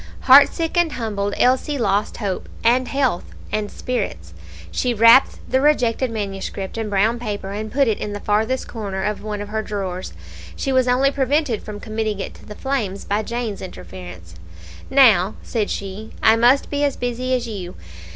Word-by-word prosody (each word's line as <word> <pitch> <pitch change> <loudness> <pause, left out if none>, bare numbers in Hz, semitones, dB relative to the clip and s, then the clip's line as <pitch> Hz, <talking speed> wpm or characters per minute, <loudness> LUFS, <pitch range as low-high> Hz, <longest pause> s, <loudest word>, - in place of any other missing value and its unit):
Heartsick 285 +5 +5
and 340 -3 +2
humbled, 205 -4 -2
Elsie 260 +3 +2
lost 205 -3 0
hope, 200 -5 -4
and 245 +2 +3
health, 265 -10 -1 0.2
and 210 -1 -1
spirits. 85 - -4 0.4
She 245 - 0
wrapped 230 +4 +6
the 260 - +1
rejected 260 -4 +2
manuscript 195 -3 -5
in 225 -2 -3
brown 215 +4 +2
paper, 205 -4 -4
and 215 +2 -5
put 275 0 +2
it 220 - 0
in 210 - -4
the 205 - -5
farthest 220 +6 0
corner 200 -4 -4
of 210 +1 -2
one 210 -1 -4
of 205 - -7
her 220 +1 -1
drawers. 190 - -5 0.4
She 270 - -2
was 260 -1 +3
only 260 +3 +3
prevented 275 -3 0
from 210 -1 -8
committing 215 -2 -3
it 195 - -5
to - - -16
the 210 - -8
flames 220 -8 -3
by 205 +2 0
Jane's 235 -2 -4
interference. 90 - -10 0.6
"Now," 220 -8 +5
said 220 -4 -2
she, 200 +2 -6
"I 220 - +6
must 245 +4 +3
be 290 0 0
as 285 -1 0
busy 250 +1 -1
as 245 -1 -3
you. 190 -5 -6
220 Hz, 175 wpm, -21 LUFS, 200-255 Hz, 0.6 s, wrapped